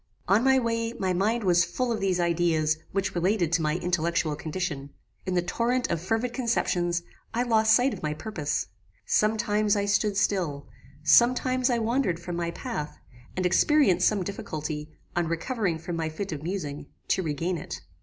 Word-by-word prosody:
On 200 +5 +4
my 265 0 +5
way 230 -2 -1
my 190 -5 -1
mind 215 +6 +1
was 180 -2 +4
full 240 +8 -2
of 225 - -1
these 185 -2 0
ideas 165 -2 +1
which 190 0 -1
related 175 -1 +1
to 165 - +3
my 155 0 +1
intellectual 170 -3 0
condition. 150 -3 -4 0.4
In 185 - 0
the 175 - +2
torrent 240 +7 0
of 170 -2 -1
fervid 225 +6 -1
conceptions, 175 -8 0 0.3
I 240 - +2
lost 220 -2 +4
sight 250 +3 +3
of - - -8
my 150 0 -2
purpose. 155 -5 -2 0.4
Some 215 +1 +2
times 210 -1 +1
I 200 -1 0
stood 205 0 +1
still; 170 -9 0 0.4
some 240 +11 +6
times 255 0 0
I 240 - +2
wandered 230 -6 0
from 175 0 -5
my 170 0 -1
path, 170 - -5 0.4
and 185 - 0
experienced 190 - +4
some 205 -3 +1
difficulty, 155 -5 -5 0.3
on 175 -1 +1
recovering 175 +1 -1
from 170 +1 -5
my 160 -1 -1
fit 185 +5 -5
of 150 -3 -4
musing, 150 -5 -4 0.2
to - - +2
regain 165 +2 -2
it. - - -7
185 Hz, 180 wpm, -27 LUFS, 165-225 Hz, 0.4 s, some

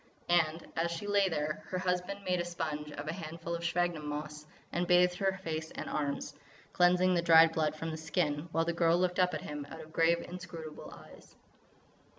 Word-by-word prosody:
And, 165 -1 +2
as 165 +1 +1
she 170 +3 -5
lay 200 -1 +3
there, 155 -2 -2
her 185 - -3
husband 185 +2 -2
made 180 -1 0
a - - -1
sponge 155 -3 -4
of 145 +1 -6
a 155 - -1
handful 165 -1 -6
of 170 0 -3
sphagnum 170 -3 0
moss, 150 +1 -5 0.2
and 175 +1 -1
bathed 180 0 +4
her 195 -1 0
face 160 -1 -3
and - - -6
her - - -4
arms, 140 -2 -2 0.4
cleansing 180 +1 +4
the 175 - +2
dried 165 -1 +7
blood 155 -1 0
from 160 +1 -4
the 160 - -5
skin, 155 0 -1
while 165 0 +1
the 170 - 0
girl 170 0 +3
looked 180 0 0
up 180 0 +3
at - - -4
him 150 -1 -6
out - - -9
of 155 0 -13
grave, 170 +1 +3
inscrutable 170 -3 -8
eyes. - - -15
170 Hz, 205 wpm, -32 LUFS, 155-180 Hz, 0.4 s, dried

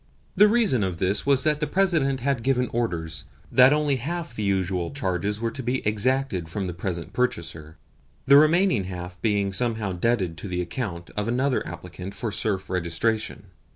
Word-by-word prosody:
The 210 - +7
reason 210 - +3
of 95 -2 -2
this 95 +8 0
was 135 -2 +4
that 150 -1 +2
the 150 - -1
President 160 -9 +1
had 135 -1 0
given 125 0 +1
orders 85 -10 -2 0.3
that 130 +1 +7
only 150 -2 +2
half 165 +4 -4
the 110 - -5
usual 95 -3 0
charges 105 -5 -2
were 115 0 -1
to 130 - -6
be 125 +1 -2
exacted 105 -4 0
from 95 +4 -3
the 90 - -4
present 85 0 -5
purchaser 85 -10 -2 0.5
the 140 +1 +8
remaining 155 - +4
half 90 -1 -7
being 100 -3 +1
somehow 110 -2 -1
debited 90 -3 0
to - - -6
the 90 -1 -3
account 85 -1 -4
of 105 0 -2
another 130 +3 +1
applicant 90 +3 -8
for 110 +2 -3
serf 95 -2 -1
registration. 95 +3 -2
105 Hz, 175 wpm, -25 LUFS, 90-130 Hz, 0.5 s, the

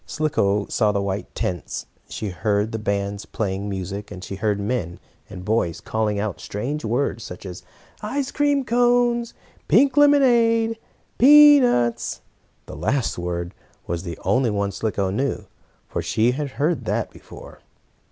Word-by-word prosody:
Slicko 105 -10 0
saw 105 -3 +1
the 100 - -1
white 100 0 -4
tents, 90 -3 -3 0.2
she 105 - -4
heard 100 +4 -1
the 110 - -3
bands 100 -1 -2
playing 100 -1 -3
music, 100 +2 -5
she - - -7
heard 105 -1 0
men 100 -5 -3 0.3
and 90 0 -9
boys 105 -6 0
calling 110 -2 -1
out 105 -2 -3
strange 130 +9 -4
words, 115 0 -1
such 90 - -9
as 90 -1 -7 0.4
"ice 265 +6 -2
cream 285 -2 +1
cones!" 240 0 +2 0.3
"pink 275 -2 +4
lemonade!" 240 -6 +4
and 225 - -5 0.4
"peanuts!" 270 - +6 0.4
The - - -9
last 110 - -1
word 85 +1 -4 0.3
was 85 0 -3
the 85 -3 -6
only 125 -2 +2
one 100 -1 -1
Slicko 100 -1 -2
knew, 135 +8 -2 0.4
for - - -3
she 100 +8 +1
had 140 +1 -4
heard 155 +3 0
that - - -1
before. - - -13
110 Hz, 145 wpm, -22 LUFS, -, 0.4 s, peanuts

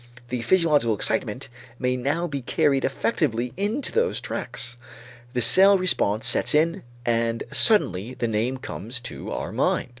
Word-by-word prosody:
The 125 -1 -3
physiological 145 -6 +2
excitement 110 +4 -1 0.3
may 125 0 0
now 145 +7 -1
be 140 -5 -4
carried 135 +2 +1
effectively 125 - -1
into 210 +8 -2
those 470 +1 0
tracts. 120 0 -5 0.6
The 125 - +1
cell 195 - +6
response 115 - +1
sets 125 +4 +2
in 165 +5 +2 0.2
and 115 0 0
suddenly 120 - +3
the 120 -1 -2
name 115 +4 -1
comes 120 -1 -6
to 125 - -8
our - - -4
mind. - - 0
125 Hz, 145 wpm, -24 LUFS, 115-165 Hz, 0.6 s, cell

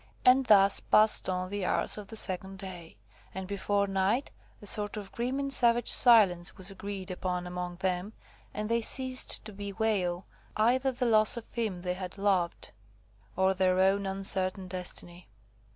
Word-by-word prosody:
And 255 +1 +4
thus 200 -2 +4
passed 215 -2 +3
on 185 0 -3
the 205 -1 -4
hours - - 0
of 210 -2 -10
the 225 - -10
second 190 -2 +1
day, 180 -4 -10 0.4
and 190 0 -5
before 200 0 -1
night 195 +7 -1 0.3
a - - -14
sort 205 +1 +1
of 200 -2 -9
grim 250 +3 -3
and 275 0 -1
savage 240 -2 +3
silence 195 -8 +4
was 185 +1 -3
agreed 195 -1 -7
upon 180 -1 -4
among 180 0 -6
them, 185 +2 -3 0.4
and 210 0 -5
they 230 +1 0
ceased 255 +1 +3
to 215 - -8
bewail 200 -3 -3 0.3
either 250 +5 +1
the 250 0 -3
loss 215 0 +3
of 235 - -10
him 210 -7 -4
they 180 -1 -2
had 185 +1 -8
loved, 190 -4 -1 0.6
or 190 +1 +1
their 185 -1 0
own 195 +1 +1
uncertain 190 -1 +1
destiny. 180 -1 -4
195 Hz, 165 wpm, -28 LUFS, 185-220 Hz, 0.6 s, And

